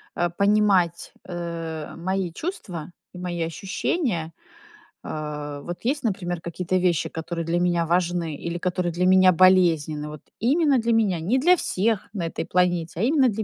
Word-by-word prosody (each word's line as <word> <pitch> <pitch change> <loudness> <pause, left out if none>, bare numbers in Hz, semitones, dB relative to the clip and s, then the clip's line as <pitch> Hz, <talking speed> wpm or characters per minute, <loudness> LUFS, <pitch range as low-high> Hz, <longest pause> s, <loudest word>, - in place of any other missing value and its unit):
а, 175 - +1
понимать, 200 -2 +2 0.2
э, 165 -3 -5
мои 185 0 -2
чувства 180 - -6 0.2
и - - -10
мои 175 -1 -4
ощущения. 180 - -2 0.7
Э, 150 -1 -5
вот 175 +4 -6
есть, 275 +3 0
например, 180 -5 -2
какие-то 180 +2 -2
вещи, 180 -3 +1
которые 165 +1 -4
для 170 +1 0
меня 175 -1 +1
важны 170 -2 0
или 170 +4 -4
которые 180 0 -1
для 180 +1 0
меня 185 0 +6
болезненны, 165 -5 +4
вот 150 -2 -9 0.2
именно 285 +3 +3
для 230 0 +1
меня, 205 -6 +2
не 200 +11 +1
для 350 +7 +5
всех 215 - 0
на 175 -6 -2
этой 165 - -4
планете, 175 -2 0
а - - +2
именно 270 +1 +4
для 220 0 -2
175 Hz, 160 wpm, -24 LUFS, 165-200 Hz, 0.7 s, меня